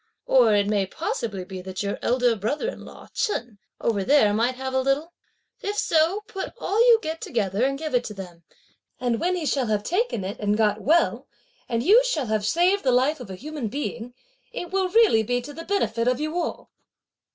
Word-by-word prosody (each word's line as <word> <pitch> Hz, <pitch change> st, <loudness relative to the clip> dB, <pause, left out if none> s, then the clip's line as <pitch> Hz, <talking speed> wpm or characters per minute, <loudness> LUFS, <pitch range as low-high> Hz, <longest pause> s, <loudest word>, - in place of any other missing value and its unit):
Or 235 Hz, -5 st, +5 dB
it 205 Hz, -1 st, +3 dB
may 200 Hz, -2 st, 0 dB
possibly 200 Hz, 0 st, -4 dB
be 185 Hz, 0 st, -7 dB
that 185 Hz, +1 st, -5 dB
your 200 Hz, -, -3 dB
elder 245 Hz, -1 st, +2 dB
brother 225 Hz, -, -2 dB
in -, -, -9 dB
law -, -, -13 dB
Chen, 240 Hz, -, -2 dB, 0.2 s
over 205 Hz, -4 st, 0 dB
there, 255 Hz, -4 st, +4 dB
might 235 Hz, +4 st, +1 dB
have 260 Hz, 0 st, -5 dB
a 260 Hz, -, +2 dB
little. 280 Hz, +6 st, 0 dB, 0.5 s
If 410 Hz, +1 st, -4 dB
so, 335 Hz, +5 st, +2 dB
put 420 Hz, -3 st, -6 dB
all 420 Hz, -3 st, -1 dB
you 470 Hz, -2 st, +8 dB
get 320 Hz, +1 st, -4 dB
together, 205 Hz, -2 st, -1 dB
and 275 Hz, +1 st, +1 dB
give 310 Hz, 0 st, -5 dB
it 245 Hz, -1 st, +2 dB
to 210 Hz, -, -6 dB
them; 180 Hz, -3 st, -9 dB, 0.6 s
and 240 Hz, -2 st, 0 dB
when 365 Hz, +1 st, +1 dB
he 340 Hz, -3 st, -3 dB
shall 270 Hz, -4 st, 0 dB
have 210 Hz, -1 st, 0 dB
taken 365 Hz, -, -1 dB
it, 195 Hz, +2 st, -5 dB
and 210 Hz, 0 st, +1 dB
got 215 Hz, -2 st, +1 dB
well 330 Hz, +5 st, +2 dB, 0.4 s
and 230 Hz, -1 st, 0 dB
you 440 Hz, -, +6 dB
shall 325 Hz, -, -1 dB
have 215 Hz, -2 st, -1 dB
saved 360 Hz, -, +2 dB
the 260 Hz, -, +3 dB
life 265 Hz, +5 st, +2 dB
of 245 Hz, -5 st, -9 dB
a 190 Hz, -, -6 dB
human 290 Hz, +2 st, -5 dB
being, 245 Hz, -1 st, -5 dB, 0.4 s
it 355 Hz, -, -6 dB
will 380 Hz, -1 st, +1 dB
really 425 Hz, -, +5 dB
be 245 Hz, +3 st, 0 dB
to 255 Hz, +4 st, -9 dB
the 330 Hz, +3 st, -8 dB
benefit 240 Hz, -, 0 dB
of 250 Hz, +1 st, +2 dB
you 310 Hz, +2 st, -3 dB
all." 350 Hz, -2 st, -3 dB
250 Hz, 210 wpm, -24 LUFS, 215-325 Hz, 0.6 s, you